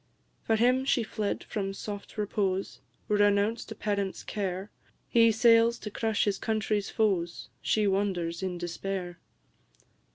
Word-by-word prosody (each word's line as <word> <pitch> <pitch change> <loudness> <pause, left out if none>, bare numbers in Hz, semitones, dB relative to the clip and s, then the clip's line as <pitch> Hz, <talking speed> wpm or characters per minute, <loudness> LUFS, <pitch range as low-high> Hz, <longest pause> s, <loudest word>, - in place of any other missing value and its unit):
For 225 - +1
him 250 +4 +3
she 265 -3 +2
fled 215 -2 -3
from 195 -2 -3
soft 205 +1 -7
repose, 195 -2 -1 0.3
Renounced 205 +2 +2
a - - -5
parent's 200 -2 -2
care; 195 -1 -3 0.4
He 230 -1 +5
sails 230 +1 +5
to 210 - -7
crush 220 0 0
his 200 -2 0
country's 215 -2 -1
foes, 185 -6 0
She 215 -1 +2
wanders 190 -4 0
in 185 -2 -2
despair! 175 0 -4
205 Hz, 130 wpm, -29 LUFS, 190-220 Hz, 0.4 s, He